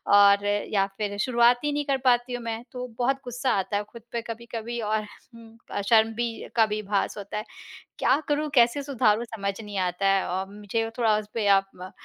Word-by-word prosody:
और 200 Hz, 0 st, +6 dB, 0.3 s
या 195 Hz, -2 st, +3 dB
फिर 205 Hz, -1 st, -3 dB
शुरुआत 240 Hz, 0 st, +4 dB
ही 295 Hz, -, +1 dB
नहीं 290 Hz, 0 st, -1 dB
कर 275 Hz, -2 st, +1 dB
पाती 245 Hz, 0 st, +3 dB
हूँ 245 Hz, -1 st, -4 dB
मैं, 230 Hz, 0 st, -4 dB
तो 250 Hz, -1 st, -5 dB
बहुत 265 Hz, +2 st, +2 dB
गुस्सा 245 Hz, +2 st, -1 dB
आता 205 Hz, +2 st, -1 dB
है 205 Hz, -, -2 dB
खुद 235 Hz, -, -12 dB
पे 235 Hz, -, -2 dB
कभी-कभी 235 Hz, 0 st, -6 dB
और 215 Hz, 0 st, 0 dB
हुँ 225 Hz, +1 st, -16 dB
अ, -, -, -2 dB
शर्म 225 Hz, +1 st, +4 dB
भी 235 Hz, 0 st, -3 dB
का 225 Hz, -2 st, +5 dB
भी 215 Hz, 0 st, -3 dB
भास 200 Hz, +1 st, -1 dB
होता 200 Hz, 0 st, -6 dB
है। 210 Hz, -, -4 dB, 0.5 s
क्या 275 Hz, -, +3 dB
करूँ, 300 Hz, +1 st, 0 dB
कैसे 240 Hz, +2 st, +4 dB
सुधारूँ 240 Hz, -5 st, +2 dB
समझ 200 Hz, -1 st, -2 dB
नहीं 205 Hz, -2 st, -5 dB
आता 180 Hz, +1 st, 0 dB
है। 195 Hz, -1 st, +2 dB
औ 185 Hz, +2 st, -1 dB
मुझे 210 Hz, +2 st, -3 dB
थोड़ा 220 Hz, -3 st, +3 dB
उस 210 Hz, -1 st, -7 dB
पे 220 Hz, -3 st, -1 dB
आप 195 Hz, 0 st, -6 dB
म 185 Hz, +1 st, -8 dB
225 Hz, 215 wpm, -26 LUFS, 205-240 Hz, 0.5 s, और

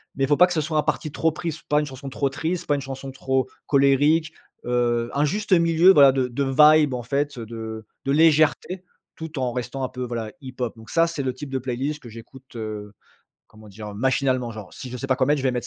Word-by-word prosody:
mais, 135 Hz, 0 st, 0 dB
faut 145 Hz, -, +3 dB
pas 180 Hz, -, +7 dB
que 180 Hz, -, -3 dB
ce 160 Hz, -, 0 dB
soit 155 Hz, +1 st, -2 dB
un 150 Hz, -, +3 dB
parti 155 Hz, -, -2 dB
trop 165 Hz, +1 st, +1 dB
pris, 165 Hz, 0 st, -4 dB
pas 150 Hz, -, +4 dB
une 150 Hz, -, -1 dB
chanson 135 Hz, 0 st, -8 dB
trop 140 Hz, +1 st, -1 dB
triste, 160 Hz, +6 st, -3 dB
pas 145 Hz, -, +2 dB
une 140 Hz, -, -3 dB
chanson 135 Hz, 0 st, -7 dB
trop 130 Hz, -1 st, -1 dB, 0.2 s
colérique, 145 Hz, +3 st, +3 dB, 0.3 s
heu, 120 Hz, -1 st, 0 dB
un 145 Hz, -, +1 dB
juste 205 Hz, +7 st, -3 dB
milieu, 170 Hz, +1 st, +5 dB
voilà, 140 Hz, -5 st, +7 dB
de 130 Hz, -1 st, 0 dB
de 125 Hz, +3 st, -2 dB, 0.3 s
vibe 150 Hz, -4 st, +2 dB
en 125 Hz, -1 st, -4 dB
fait, 140 Hz, +2 st, -2 dB
heu, 115 Hz, -, -6 dB
de 110 Hz, -1 st, -7 dB, 0.2 s
de 135 Hz, -, 0 dB
légèreté 160 Hz, +4 st, +3 dB, 0.3 s
tout 160 Hz, -2 st, -6 dB
en 125 Hz, -2 st, -1 dB
restant 125 Hz, +2 st, -4 dB
un -, -, -2 dB
peu, 125 Hz, -, -6 dB
voilà, 115 Hz, -3 st, -4 dB
hip 130 Hz, -2 st, -9 dB
hop. 125 Hz, -2 st, -2 dB
Donc 110 Hz, -1 st, -14 dB
ça, 165 Hz, 0 st, +3 dB
c'est 160 Hz, -5 st, -4 dB
le 130 Hz, -, -1 dB
type 135 Hz, +2 st, -8 dB
de 135 Hz, -, -2 dB
playlist 130 Hz, +4 st, -3 dB
que 120 Hz, -, -11 dB
j'écoute, 120 Hz, +4 st, -14 dB
heu, 105 Hz, -2 st, -6 dB, 0.6 s
comment 110 Hz, 0 st, -16 dB
dire, 105 Hz, +1 st, -9 dB
heu? -, -, -10 dB
Machinalement, 130 Hz, +1 st, 0 dB
genre. 110 Hz, -3 st, -10 dB
Si 130 Hz, -, -8 dB
je 125 Hz, -, -6 dB
sais 135 Hz, -, -5 dB
pas 130 Hz, -1 st, +1 dB
quoi 130 Hz, -1 st, +1 dB
mettre, 150 Hz, +1 st, +3 dB
je -, -, -4 dB
vais 130 Hz, -, +2 dB
mettre 125 Hz, -1 st, -3 dB
135 Hz, 255 wpm, -23 LUFS, 120-150 Hz, 0.6 s, pas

